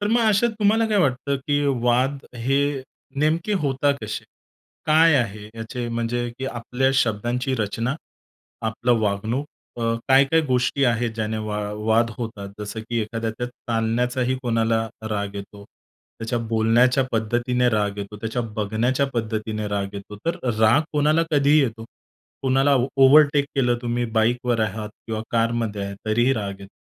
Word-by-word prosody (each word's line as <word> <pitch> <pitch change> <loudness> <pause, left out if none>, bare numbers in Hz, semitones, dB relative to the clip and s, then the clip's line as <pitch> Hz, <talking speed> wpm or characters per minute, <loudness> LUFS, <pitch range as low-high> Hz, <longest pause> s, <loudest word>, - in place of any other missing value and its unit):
तर 205 - 0
मग 235 +2 +3
अशात 215 +3 +3
तुम्हाला, 220 +2 +3
काय 210 -1 +2
वाटतं 140 -3 +1
की 145 -1 +2 0.2
वाद, 130 +3 +2 0.2
हे 125 +4 0 0.6
नेमके 165 +6 +1
होतात 140 +1 +2
कसे? 110 0 -5 0.6
काय 160 +1 +5
आहे, 110 -5 -2
याचे 120 +2 -5
म्हणजे 120 +1 -2
की 135 - -4
आपल्या 125 +2 -1
शब्दांची 120 +2 0
रचना, 115 +4 -1 0.7
आपलं 120 +2 +1
वागणूक, 110 +7 -1 0.3
अ, 115 0 +1
काय-काय 135 +4 +5
गोष्टी 130 +2 +2
आहेत, 120 -1 +1
ज्याने 110 0 -2
वा 105 0 -2 0.3
वाद 115 +1 +3
होतात. 110 -4 -5
जसं 105 +2 -5
की 115 +1 -3
एखाद्याच्या 115 +2 -3
चालण्याचाही 120 +2 -1
कोणाला 115 -2 +1 0.2
राग 100 -1 -2
येतो, 100 0 -9 0.5
त्याच्या 115 +1 -2
बोलण्याच्या 120 +4 +3
पद्धतीने 120 +3 +1
राग 105 -2 0
येतो, 100 +1 -6
त्याच्या 115 +3 -3
बघण्याच्या 115 +6 0
पद्धतीने 110 -2 -2
राग 100 -1 -3
येतो, 100 +1 -8
तर 165 - 0 0.2
राग 110 +7 +5
कोणाला 150 +2 +3
कधीही 145 0 +4
येतो. 115 -3 -3 0.6
कोणाला 135 +1 +3 0.2
ओव्हरटेक 140 +1 +6
केलं 125 -3 +2
तुम्ही, 120 0 -1
बाईकवर 120 +1 +1
आहात 110 0 -2 0.2
किंवा 110 -1 -3
कारमध्ये 115 -3 0
आहे, 100 0 -5
तरीही 120 +4 +3
राग 100 -5 -4
येतो. 100 0 -12
120 Hz, 145 wpm, -23 LUFS, 110-135 Hz, 0.7 s, ओव्हरटेक